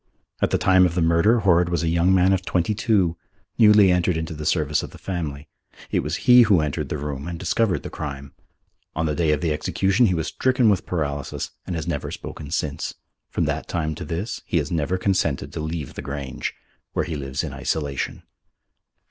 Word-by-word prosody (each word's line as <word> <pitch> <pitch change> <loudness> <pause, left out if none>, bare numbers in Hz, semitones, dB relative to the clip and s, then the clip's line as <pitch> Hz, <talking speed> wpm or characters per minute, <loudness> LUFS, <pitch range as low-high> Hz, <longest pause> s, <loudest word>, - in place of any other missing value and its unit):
At - - +3
the - - +2
time 95 -1 +5
of 85 - -6
the 90 - +1
murder 85 +8 +4
Horrod 90 -3 +3
was 85 -2 0
a - - 0
young 85 +2 +3
man 95 0 +4
of 95 -1 0
twenty 90 +3 0
two, 100 -6 +1 0.4
newly 105 -4 +7
entered 90 -1 +2
into 80 +1 -4
the 75 0 -5
service 75 -2 +1
of - - -7
the - - -13
family. 80 -6 -5 0.4
It - - +2
was 75 +3 -2
he 125 -1 +8
who 100 -6 +5
entered 75 -2 -2
the - - -2
room 70 0 -5
and 85 -1 -4
discovered 105 +3 0
the - - -7
crime. 70 -2 -6 0.6
On 80 - 0
the 75 - 0
day 80 -1 +1
of 75 -1 0
the 80 -3 +1
execution 95 +9 +2
he 90 - +1
was 80 - -1
stricken 130 -4 +2
with 95 - -1
paralysis 70 -5 -3 0.2
and 90 - -3
has 80 -1 -3
never 80 -5 -2
spoken 75 -2 -8
since. 75 -3 -2 0.3
From - - -1
that - - -2
time 80 -2 -2
to 75 - -7
this 95 +7 -4
he - - 0
has 75 -2 -1
never 85 +2 0
consented 90 -7 0
to - - -4
leave 80 -2 -4
the - - -6
Grange, 70 -2 -5 0.4
where - - 0
he 80 - -4
lives 70 -2 -3
in - - -5
isolation. 70 -4 -3
85 Hz, 210 wpm, -23 LUFS, 75-95 Hz, 0.6 s, he